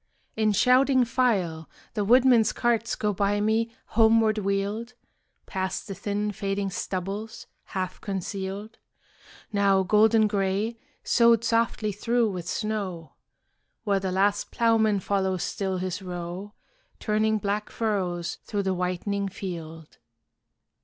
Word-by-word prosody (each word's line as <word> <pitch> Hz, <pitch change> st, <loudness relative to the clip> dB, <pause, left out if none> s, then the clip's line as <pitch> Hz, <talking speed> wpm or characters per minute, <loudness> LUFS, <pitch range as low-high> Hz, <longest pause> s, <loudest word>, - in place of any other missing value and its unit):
In 215 Hz, -1 st, +2 dB
shouting 255 Hz, +4 st, +4 dB
file 195 Hz, -10 st, 0 dB, 0.2 s
The 210 Hz, -3 st, -1 dB
woodmen's 240 Hz, 0 st, +5 dB
carts 235 Hz, -1 st, 0 dB
go 210 Hz, -1 st, -1 dB
by 200 Hz, +1 st, +1 dB
me 220 Hz, +2 st, +1 dB, 0.2 s
homeward 220 Hz, -1 st, +4 dB
wheeled, 205 Hz, +4 st, -2 dB, 0.5 s
Past 190 Hz, +1 st, -3 dB
the 200 Hz, -, -4 dB
thin 205 Hz, +1 st, -2 dB
fading 195 Hz, 0 st, -2 dB
stubbles, 195 Hz, +5 st, -4 dB, 0.2 s
half 185 Hz, -2 st, -4 dB
concealed, 195 Hz, +2 st, -5 dB, 0.7 s
Now 200 Hz, -1 st, +3 dB
golden 220 Hz, +3 st, +4 dB
gray, 205 Hz, +3 st, -1 dB, 0.2 s
sowed 235 Hz, -1 st, +4 dB
softly 230 Hz, -2 st, +1 dB
through 230 Hz, +2 st, +1 dB
with 175 Hz, -2 st, -6 dB
snow, 200 Hz, -7 st, -3 dB, 0.7 s
Where 200 Hz, -3 st, +1 dB
the 190 Hz, -1 st, -2 dB
last 200 Hz, +2 st, +1 dB
ploughman 220 Hz, -3 st, +2 dB
follows 190 Hz, -2 st, 0 dB
still 190 Hz, -2 st, -2 dB
his 185 Hz, +1 st, -3 dB
row, 180 Hz, +3 st, -6 dB, 0.4 s
Turning 215 Hz, 0 st, +1 dB
black 210 Hz, +1 st, -2 dB
furrows 185 Hz, -6 st, -2 dB
through 205 Hz, -1 st, -2 dB
the 190 Hz, -1 st, 0 dB
whitening 185 Hz, +2 st, -2 dB
field. 165 Hz, -5 st, -8 dB
205 Hz, 120 wpm, -26 LUFS, 190-220 Hz, 0.7 s, woodmen's